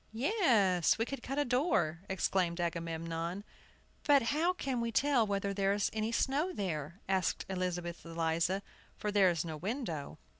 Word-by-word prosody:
"Yes, 225 - +3
we 225 - +1
could 275 0 -5
cut 270 +3 -4
a 290 - +2
door," 235 - +1
exclaimed 185 -2 0
Agamemnon. 165 +1 -3 0.6
"But 285 -3 +5
how 330 +4 +3
can 270 -9 -2
we 230 0 -1
tell 265 -2 +3
whether 200 0 -1
there 195 0 +2
is 205 0 0
any 220 +1 -1
snow 280 +9 +1
there?" 170 - -4
asked 190 -3 0
Elizabeth 180 -2 -3
Eliza, 165 +3 0 0.3
"for 210 - -2
there 200 -2 +5
is 170 -1 -1
no 160 -2 -5
window." 180 - -4
195 Hz, 155 wpm, -33 LUFS, 170-240 Hz, 0.6 s, But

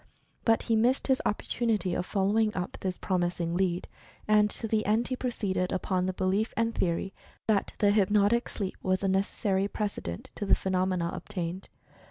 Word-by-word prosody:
But 225 -1 +3
he 230 - +1
missed 240 +4 +2
his 265 -1 +2
opportunity 210 -3 0
of 180 - -2
following 210 +2 +1
up 180 0 -4
this 185 -2 -3
promising 175 -2 -1
lead, 180 -1 0 0.4
and 210 0 +5
to 225 - -4
the 215 0 +1
end 220 +3 +2
he 255 - 0
proceeded 200 -8 -1
upon 185 -1 0
the - - +1
belief 190 +4 0
and 230 0 +1
theory 185 +1 -1 0.3
that 215 -3 +1
the 205 -2 +4
"hypnotic 205 +3 +3
sleep" 195 -3 -4
was 185 +1 0
a - - +2
necessary 195 +1 +1
precedent 205 - -4
to - - -5
the - - +6
phenomena 185 -2 0
obtained. 185 -1 -4
195 Hz, 170 wpm, -29 LUFS, 185-215 Hz, 0.4 s, the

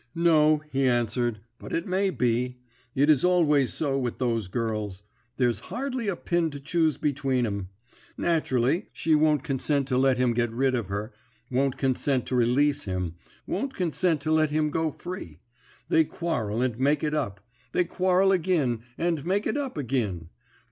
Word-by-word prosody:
"'No,' 155 -2 +4
he 135 0 +2
answered, 120 -2 0 0.2
'but - - -9
it 165 - -1
may 190 +1 +1
be. 125 -4 0 0.4
It 140 +2 +3
is 150 -4 +4
always 155 -7 +3
so 140 -3 -1
with 125 -3 -3
those 115 -5 -1
girls; 105 -2 -3 0.3
there's 120 -5 +1
hardly 255 -3 -3
a 195 - 0
pin 170 -1 0
to 145 -1 -8
choose 155 +2 +1
between 135 -4 0
'em. 100 -4 -4 0.5
Naturally, 160 - +1
she 160 - 0
won't 150 -2 +3
consent 140 -1 0
to 125 -1 +2
let 135 -1 +3
him 125 -1 +2
get 120 0 +1
rid 130 +3 +1
of 120 -6 -1
her 105 +4 -4 0.4
won't 135 +1 +1
consent 130 -1 0
to 130 - -2
release 140 +4 +2
him 90 -3 -3 0.3
won't 275 0 -3
consent 170 -2 +1
to 155 +1 -1
let 155 -1 +3
him 150 0 0
go 160 +1 0
free. 165 - -8 0.5
They 160 - +4
quarrel, 125 - -2
and 125 -2 -2
make 145 +3 +2
it 150 -1 0
up. 100 -10 -2 0.3
They 180 - +2
quarrel 185 +2 +2
agin, 160 -10 +1 0.2
and 165 -4 0
make 195 +5 0
it - - 0
up 280 - -3
agin. 110 - -2
140 Hz, 170 wpm, -26 LUFS, 120-165 Hz, 0.5 s, No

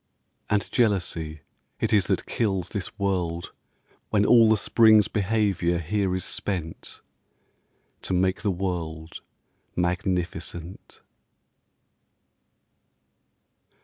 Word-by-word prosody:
And 105 -1 +1
jealousy 85 - 0 0.4
it - - 0
is 100 -4 +3
that - - 0
kills 95 -6 -1
This 100 -3 -5
world 90 -4 -2 0.6
when 105 -1 +2
all 115 -1 +6
The 110 - +4
spring's 110 0 +5
behaviour 100 -4 0
here 95 +3 -1
is 95 - -3
spent 85 -5 -4 1.0
To - - -5
make 95 +1 +1
the 105 - 0
world 85 -4 -4 0.5
magnificent. 90 -1 -3
95 Hz, 90 wpm, -25 LUFS, 85-105 Hz, 1.0 s, all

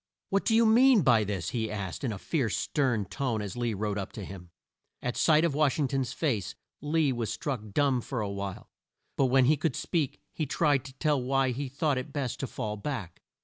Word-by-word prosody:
"What 195 0 +1
do 225 - +3
you 230 +1 +5
mean 235 -1 +6
by 120 -5 +5
this?" 100 -4 -3
he 110 -3 -1
asked 100 - -5
in 125 - 0
a 105 - -4
fierce 120 - -1
stern 125 -9 0
tone 120 +2 -2
as 100 -2 -5
Lee 120 -3 -1
rode 105 0 -2
up 95 - -5
to 105 - -6
him. 90 -2 -10 0.5
At 125 - -3
sight 155 0 +4
of 165 - +1
Wash 150 -2 +2
ing 145 -3 +1
ton's 135 -3 -1
face 120 - -1 0.3
Lee 150 -1 +2
was 120 -3 -2
struck 135 -7 -3
dumb 135 +1 +2
for 125 +1 -4
a 105 - -1
while, 100 -1 -6 0.4
but 135 - +3
when 130 0 +4
he 150 +4 +4
could 155 -2 -1
speak 160 -7 -1
he 155 - -2
tried 145 -5 +2
to 135 - -9
tell 145 0 +1
why 135 +1 +1
he 135 +4 -3
had 130 - -9
thought 145 -1 +1
it 130 +3 -7
best 130 -3 -3
to 135 - -2
fall 105 -2 -4
back. 105 - -5
130 Hz, 230 wpm, -29 LUFS, 110-145 Hz, 0.5 s, mean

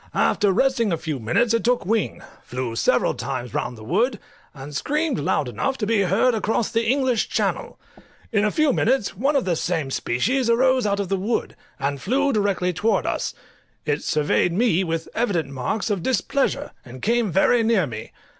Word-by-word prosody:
After 205 -3 +2
resting 235 0 +2
a 165 - +1
few 155 -3 -4
minutes 220 - +1
it 230 - +1
took 245 -4 +1
wing, 220 +2 -1 0.2
flew 125 -2 -4
several - - +2
times 120 -2 -5
round 120 -1 -3
the 110 - -11
wood, 215 - +1 0.3
and 140 0 -10
screamed 300 - 0
loud 150 -3 0
enough 270 - -2
to 215 - -2
be 220 -1 +2
heard 200 +7 +2
across 220 0 0
the 230 0 0
English 260 -3 +1
Channel. - - -2 0.5
In 210 -3 +2
a 215 - +3
few 300 +4 +2
minutes 235 -5 +1
one 275 +9 +1
of 275 - +2
the 175 -2 +1
same 160 -5 -2
species 235 - 0
arose 255 0 +3
out 200 0 0
of 200 -3 -2
the 195 - +1
wood, 210 +5 -2 0.2
and 140 0 -2
flew 275 +6 +1
directly 200 -4 +1
towards 215 +6 +1
us; - - -2 0.5
it 150 0 0
surveyed 150 +3 +1
me 190 -3 +2
with 165 -2 -3
evident 185 - 0
marks 140 - -2
of 200 -4 -1
displeasure, 275 - 0
and 130 0 -12
came 230 -2 +1
very 210 +6 +4
near 220 -6 +2
me. 110 -5 -7
205 Hz, 185 wpm, -23 LUFS, 160-240 Hz, 0.5 s, very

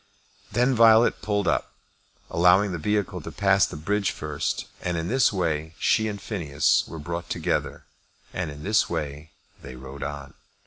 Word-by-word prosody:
Then 125 +2 +2
Violet 115 -1 +5
pulled 105 -3 -1
up, - - 0 0.6
allowing 90 +4 +4
the 85 - -4
vehicle 105 +4 -1
to - - -8
pass - - +3
the - - -8
bridge 100 +6 0
first, - - -3 0.2
and 90 -1 -2
in 80 +1 -3
this 130 +2 +3
way 80 -4 -2
she 110 +1 +2
and 105 -1 -4
Phineas 100 +1 +1
were 80 - -8
brought 85 +3 -5
together, - - -2 0.5
and 90 -3 -3
in 75 0 -9
this 105 +4 +2
way 75 -2 -4 0.3
they 65 - -9
rode 65 +2 -10
on. 70 -1 -6
85 Hz, 165 wpm, -25 LUFS, 75-105 Hz, 0.6 s, Violet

